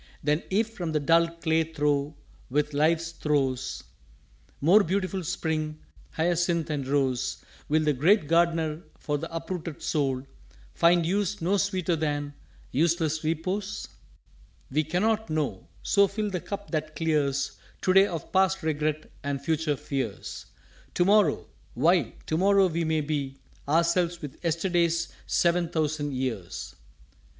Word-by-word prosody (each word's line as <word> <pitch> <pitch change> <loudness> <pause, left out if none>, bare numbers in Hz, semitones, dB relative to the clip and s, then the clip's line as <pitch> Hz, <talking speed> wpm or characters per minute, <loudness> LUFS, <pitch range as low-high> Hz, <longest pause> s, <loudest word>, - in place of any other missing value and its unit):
_" - - -24 0.2
"Then 150 +2 +2
if, 215 +4 +1
from 175 -7 -4
the 155 - +2
dull 165 +3 +4
Clay 165 -1 0
thro' 150 -2 -1 0.3
with 150 +2 0
Life's 165 +3 +2
throes, 135 -5 -1 0.8
More 180 +9 +6
beautiful 190 +1 -1
spring 155 -2 -2 0.4
Hyacinth 170 -1 +1
and 140 -3 -2
Rose, 135 -2 0 0.2
Will 155 +1 +3
the 150 -1 +2
great 165 - +4
Gardener 165 -1 +2 0.2
for 150 -2 -2
the 165 +2 -6
uprooted 165 -1 -5
soul 135 -4 0 0.5
Find 170 0 +4
Use 200 +3 0
no 185 +4 +1
sweeter 185 -4 0
than 145 -2 -2 0.4
useless 160 +1 +1
Repose?" 185 +6 -2 0.8
"_We 155 +1 +1
cannot 215 +5 +1
know 150 -11 -2 0.2
so 200 -1 +4
fill 210 +1 -3
the 180 -2 -2
cup 200 0 -6
that 155 -1 -2
clears 145 -4 +1 0.3
To 185 - +3
day 195 +1 +7
of 165 -6 -6
past 190 -1 +2
regret 155 0 -1 0.2
and 140 -1 -2
future 155 +1 0
fears: 130 -6 -4 0.5
To 175 - +3
morrow! 205 +1 +4 0.3
Why, 170 +8 +2
To 155 - -1
morrow 195 +1 +5
we 170 -2 0
may 160 -1 +1
be 140 -3 -3 0.3
Ourselves 170 +2 +2
with 150 -2 -9
Yesterday's 170 0 +1 0.2
sev'n 170 -1 +2
thousand 150 -3 -1
Years. 115 -9 -4
160 Hz, 140 wpm, -27 LUFS, 150-175 Hz, 0.8 s, day